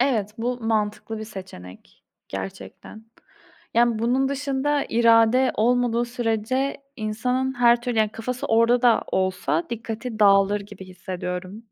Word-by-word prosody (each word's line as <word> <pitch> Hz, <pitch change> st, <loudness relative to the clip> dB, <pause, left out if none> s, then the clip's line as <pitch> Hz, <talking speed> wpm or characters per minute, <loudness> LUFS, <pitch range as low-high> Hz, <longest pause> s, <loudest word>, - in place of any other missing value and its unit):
Evet, 235 Hz, -6 st, +1 dB
bu 245 Hz, +2 st, -2 dB
mantıklı 220 Hz, 0 st, -2 dB
bir 220 Hz, -, -6 dB
seçenek, 185 Hz, -, -12 dB, 0.2 s
gerçekten. 95 Hz, -, -8 dB, 0.7 s
Yani, 235 Hz, -1 st, +3 dB
bunun 255 Hz, +4 st, +1 dB
dışında, 280 Hz, +1 st, -1 dB
irade 230 Hz, +2 st, +4 dB
olmadığı 240 Hz, +1 st, +2 dB
sürece, 240 Hz, +2 st, -1 dB, 0.2 s
insanın 250 Hz, +4 st, -1 dB
her 240 Hz, -1 st, +4 dB
türlü, 240 Hz, -2 st, -2 dB
yani 215 Hz, -1 st, +2 dB
kafası 245 Hz, +2 st, -4 dB
orada 230 Hz, +2 st, +3 dB
da 240 Hz, -2 st, +4 dB
olsa 180 Hz, -4 st, 0 dB
dikkati 230 Hz, 0 st, -5 dB
dağılır 200 Hz, 0 st, +4 dB
gibi, 200 Hz, -1 st, -11 dB
hissediyorum. 185 Hz, +2 st, -6 dB
225 Hz, 125 wpm, -23 LUFS, 205-245 Hz, 0.7 s, irade